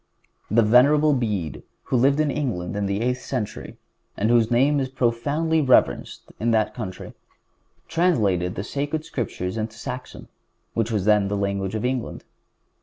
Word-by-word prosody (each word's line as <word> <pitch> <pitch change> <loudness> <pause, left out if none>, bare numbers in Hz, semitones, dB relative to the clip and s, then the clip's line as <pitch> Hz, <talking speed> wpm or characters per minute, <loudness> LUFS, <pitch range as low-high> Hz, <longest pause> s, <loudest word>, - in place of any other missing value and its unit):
The 115 +3 +4
Venerable 145 +7 +5
Bede, 105 - -2 0.2
who - - -2
lived 135 +4 +3
in 155 -2 +2
England 105 -12 -3
in 100 -1 -1
the 100 +2 -1
eighth 125 +1 -1
century, 120 -6 -5 0.4
and 110 +3 +1
whose 115 -2 +4
name 135 +5 +3
is 130 -1 -2
profoundly 140 +6 0
reverenced 130 -3 +2 0.2
in 115 - 0
that 110 -1 +2
country, 95 -3 -7 0.7
translated 105 - +1
the 100 - -3
Sacred 145 +5 -3
Scriptures 95 -5 -4
into 110 +1 -4
Saxon, 125 +1 -7 0.5
which 115 -1 0
was 105 -4 -1
then 105 -2 +4
the 100 +1 -2
language 100 0 -2
of 110 +2 -2
England. 125 -1 -3
115 Hz, 155 wpm, -23 LUFS, 105-135 Hz, 0.7 s, Venerable